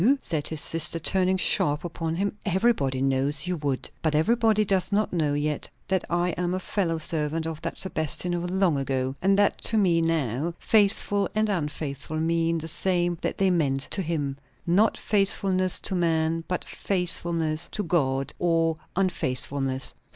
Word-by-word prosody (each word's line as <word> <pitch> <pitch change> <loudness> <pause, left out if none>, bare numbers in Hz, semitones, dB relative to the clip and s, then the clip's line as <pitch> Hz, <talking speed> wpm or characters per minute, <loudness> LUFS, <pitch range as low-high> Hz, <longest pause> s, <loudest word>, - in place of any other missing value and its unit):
_" 265 +9 +4
said 155 - -1
his 160 - -1
sister, 165 +2 +1
turning 185 +3 +2
sharp 150 -4 +3
upon 165 -1 -3
him. 200 +4 -1
"Everybody 185 - +1
knows 135 +3 +1
you 180 0 -1
would!" 140 -3 -2
"But 155 -2 0
everybody 220 +5 +3
does 190 0 +2
not 205 0 0
know 150 -4 +1
yet 150 0 -2 0.2
that 190 -1 0
I 175 +1 +1
am 180 +1 -2
a - - -2
fellow 180 -4 -1
servant 160 0 -1
of 160 -1 -5
that - - -5
Sebastian 175 0 -1
of 175 0 -2
long 185 -5 +1
ago; 130 -1 -2
and 195 +1 +3
that 205 0 +2
to 225 - +3
me 175 -5 +3
now, 160 -1 -1
faithful 205 -1 +2
and 215 0 +1
unfaithful 150 -4 -3
mean 165 +1 +1
the 160 0 -5
same 175 0 0
that - - -2
they 195 -1 +3
meant 140 -6 +1
to 195 - +1
him. 145 -5 -3 0.3
Not 200 +6 +3
faithfulness 190 -2 +1
to - - -3
man, 165 -2 0
but 180 - -3
faithfulness 170 -3 -1
to 210 - -2
God 135 -6 0
or 165 -2 +1 0.2
unfaithfulness." 135 -7 -1
165 Hz, 165 wpm, -25 LUFS, 150-185 Hz, 0.3 s, _"